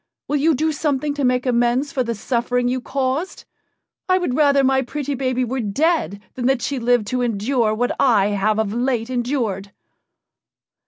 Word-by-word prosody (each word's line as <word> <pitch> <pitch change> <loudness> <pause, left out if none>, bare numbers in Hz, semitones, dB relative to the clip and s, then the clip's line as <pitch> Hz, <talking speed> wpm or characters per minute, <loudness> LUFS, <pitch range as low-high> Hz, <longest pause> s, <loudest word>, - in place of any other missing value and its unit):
Will 295 - 0
you 310 +2 +3
do 315 +4 0
something 295 -1 -1
to 285 -1 -3
make 250 0 +1
amends 245 +3 +1
for 260 - -1
the 235 -2 -2
suffering 245 +3 -1
you 255 +1 -1
caused? 270 +7 -3 0.6
I 370 - +4
would 355 -9 -1
rather 280 -2 +4
my 265 0 +3
pretty 285 +2 -4
baby 255 -1 -1
were 260 +2 -3
dead 225 - 0
than 245 -1 -2
that 265 -3 +1
she 280 -2 -2
lived 240 -2 +2
to 250 0 -1
endure 230 0 0
what 245 +2 -1
I 210 -6 +4
have 210 +1 0
of 215 -2 -1
late 240 0 -1
endured." 235 -6 -2
250 Hz, 175 wpm, -21 LUFS, 235-275 Hz, 0.6 s, I